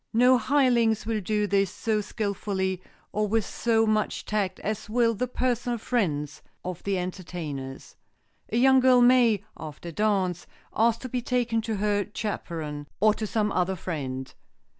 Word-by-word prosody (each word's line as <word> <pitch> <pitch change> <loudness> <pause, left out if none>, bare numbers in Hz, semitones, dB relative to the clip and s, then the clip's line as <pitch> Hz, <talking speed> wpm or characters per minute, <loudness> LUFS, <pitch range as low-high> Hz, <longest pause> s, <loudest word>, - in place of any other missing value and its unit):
No 250 +2 +5
hirelings 235 -4 +2
will 220 -1 -1
do 210 +2 0
this 195 -1 +2
so 215 -2 -1
skilfully 200 -3 -2 0.3
or 210 0 0
with 220 +1 +1
so 225 -1 +1
much 215 -1 0
tact 200 -3 -1
as 215 0 -4
will 230 0 +3
the 250 +4 -2
personal 245 -1 -1
friends 155 - -1 0.2
of 180 -2 -5
the 200 -1 -1
entertainers. 165 -7 -6 0.5
A 225 - -1
young 265 +2 +6
girl 255 -1 +5
may, 240 -5 +5
after 155 +2 -8
a - - -7
dance, 190 -2 0 0.3
ask 230 +1 +2
to 255 - -6
be 250 0 -2
taken 240 -2 0
to 220 0 -3
her 205 0 0
chaperon, 160 -8 -4
or 215 +1 +5
to 215 0 -4
some 210 -1 0
other 185 +1 0
friend. 135 -7 -5
210 Hz, 160 wpm, -26 LUFS, 185-230 Hz, 0.5 s, young